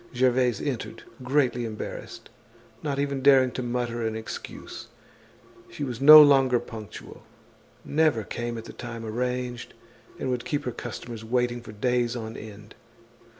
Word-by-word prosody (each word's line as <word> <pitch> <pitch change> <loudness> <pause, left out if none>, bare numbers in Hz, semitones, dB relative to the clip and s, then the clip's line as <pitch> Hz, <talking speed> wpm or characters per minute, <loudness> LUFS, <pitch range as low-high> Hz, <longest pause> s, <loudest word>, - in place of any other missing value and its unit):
Gervaise 125 -2 +2
entered, 120 -5 -4 0.2
greatly 125 -2 +1
embarrassed, 110 -2 -7 0.5
not 145 -2 -2
even 140 -1 -1
daring 130 -2 +5
to 130 - -4
mutter 120 -1 -2
an 110 -1 -2
excuse. 110 0 -8 0.8
She - - -6
was 125 -3 -4
no 155 +2 +11
longer 135 -4 +4
punctual, 110 -4 -10 0.6
never 150 -7 +2
came 120 +4 -4
at 115 - -8
the - - -10
time 115 -2 -7
arranged, 125 +2 -3 0.4
and 130 - -2
would 125 -1 -2
keep 150 -4 -2
her 125 - -3
customers 115 -1 -7
waiting 120 +1 0
for 115 - -11
days 120 +2 0
on 110 -1 -6
end. 105 0 -11
120 Hz, 145 wpm, -26 LUFS, 115-130 Hz, 0.8 s, no